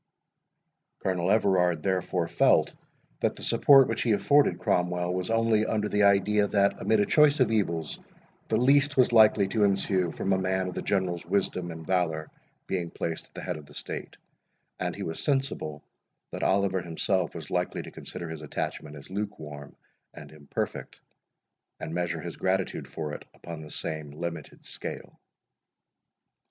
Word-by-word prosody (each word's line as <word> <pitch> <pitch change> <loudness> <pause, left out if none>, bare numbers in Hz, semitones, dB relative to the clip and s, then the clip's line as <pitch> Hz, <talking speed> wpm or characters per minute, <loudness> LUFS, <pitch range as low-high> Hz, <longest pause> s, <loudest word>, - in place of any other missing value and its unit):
Colonel 90 -1 0
Everard, 90 -6 +3
therefore, 90 -2 0
felt - - +3 0.5
that - - 0
the - - -8
support 135 -2 +6
which 115 - -2
he 115 - +2
afforded 140 -3 +3
Cromwell, 90 0 0
was 90 0 -3
only 115 -1 +3
under 105 -1 0
the 105 - +1
idea, 100 +1 +4
that, 100 0 +1
amid 110 -1 +3
a - - +3
choice 150 +2 +4
of 130 - +3
evils, 85 -8 -1 0.5
the 110 - +1
least 140 +3 +3
was 125 -2 +5
likely 110 -3 +6
to 105 +1 +1
ensue 95 -3 +1
from 95 - -1
a 95 - +1
man 95 0 0
of 90 - -5
the - - -4
General's 90 -4 -1
wisdom 90 -1 -1
and 80 -1 -8
valour 80 -4 0 0.3
being 90 -3 -2
placed 80 -1 -4
at - - -37
the - - -7
head - - -3
of 75 -2 -12
the 75 - -14
state; - - -6 0.6
and - - -2
he - - -5
was 80 0 -4
sensible, 135 - -1 0.5
that - - -6
Oliver 95 -1 +2
himself 90 +1 -1
was 80 -4 -8
likely 90 0 -1
to - - -10
consider 85 - -7
his 80 -1 -7
attachment 75 0 -5
as 70 +4 -12
lukewarm 80 -9 -6 0.4
and - - -11
imperfect, 75 -2 -5 0.8
and - - -5
measure 85 -2 -2
his 85 0 -7
gratitude 95 0 -1
for 75 -2 -5
it - - -7
upon 85 -2 -8
the 75 - -10
same 75 0 -4
limited 80 +1 -7
scale. - - -7
95 Hz, 165 wpm, -27 LUFS, 80-105 Hz, 0.8 s, support